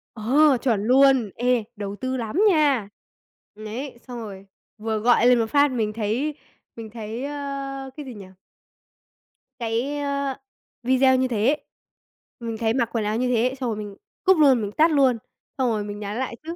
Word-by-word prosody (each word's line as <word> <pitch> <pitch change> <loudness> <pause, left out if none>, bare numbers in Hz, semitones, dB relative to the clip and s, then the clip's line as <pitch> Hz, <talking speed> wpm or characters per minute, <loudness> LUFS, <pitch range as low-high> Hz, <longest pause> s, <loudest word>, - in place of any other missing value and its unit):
Ờ, 265 +6 +4
chuẩn 225 -6 +1
luôn. 260 -2 +4
Ê, 245 -1 +1
đầu 205 -1 -5
tư 260 +4 -3
lắm 235 - -3
nha. 285 - +2 0.7
Đấy, 230 +5 -7
xong 245 -1 -6
rồi 195 -4 -8 0.3
vừa 220 0 -2
gọi 240 +2 +4
lên 250 -1 +5
một 225 - +2
phát 285 -1 +4
mình 220 -4 -1
thấy 230 +8 -2 0.4
mình 225 -1 -8
thấy, 225 +3 -6
a, 275 -1 -5
cái 295 - -7
gì 255 - -8
nhỉ? 205 -3 -10 1.3
Cái, 240 +6 -2
ơ, 280 -2 -2 0.5
video 260 +1 +4
như 260 0 +1
thế 225 -2 0
ấy, 300 - -1 0.8
mình 230 -2 -5
thấy 225 0 0
mặc 235 -3 0
quần 225 -2 0
áo 210 +1 0
như 250 +2 0
thế, 250 +1 +1
xong 250 - -2
rồi 220 - -3
mình 205 -2 -7 0.3
cúp 380 -2 +5
luôn, 270 -6 +5
mình 205 -1 -3
tắt 320 +8 +3
luôn, 270 -5 +3 0.4
xong 260 -2 +1
rồi 215 -2 -1
mình 205 0 -6
nhắn 205 +1 -5
lại 260 -2 -3
chứ, 330 +2 -6
245 Hz, 185 wpm, -23 LUFS, 220-275 Hz, 1.3 s, lên